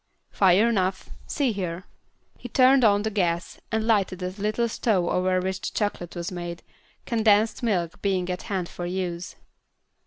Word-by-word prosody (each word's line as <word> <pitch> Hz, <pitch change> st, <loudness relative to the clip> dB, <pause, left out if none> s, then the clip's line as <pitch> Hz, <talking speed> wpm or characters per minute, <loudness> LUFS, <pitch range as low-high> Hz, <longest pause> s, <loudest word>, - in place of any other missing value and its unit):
"Fire 195 Hz, +3 st, +4 dB
enough. 190 Hz, -4 st, -1 dB, 0.2 s
See 280 Hz, -5 st, 0 dB
here." 180 Hz, -3 st, -4 dB, 0.5 s
He 245 Hz, -, -9 dB
turned 260 Hz, +2 st, +5 dB
on 205 Hz, -2 st, +4 dB
the 220 Hz, -, -1 dB
gas, 170 Hz, -4 st, -1 dB
and 220 Hz, -1 st, 0 dB
lighted 195 Hz, -5 st, +1 dB
a 180 Hz, -, -1 dB
little 215 Hz, +4 st, -1 dB
stove 215 Hz, -5 st, +1 dB
over 185 Hz, 0 st, +1 dB
which 190 Hz, +1 st, -3 dB
the -, -, -8 dB
chocolate 205 Hz, -5 st, -2 dB
was 170 Hz, +1 st, -4 dB
made, 175 Hz, -1 st, -6 dB, 0.4 s
condensed 220 Hz, -2 st, +2 dB
milk 180 Hz, -7 st, -1 dB
being 190 Hz, -3 st, 0 dB
at 180 Hz, -, -4 dB
hand 190 Hz, -3 st, -1 dB
for 175 Hz, 0 st, -6 dB
use. 180 Hz, -1 st, -4 dB
190 Hz, 160 wpm, -25 LUFS, 180-220 Hz, 0.5 s, turned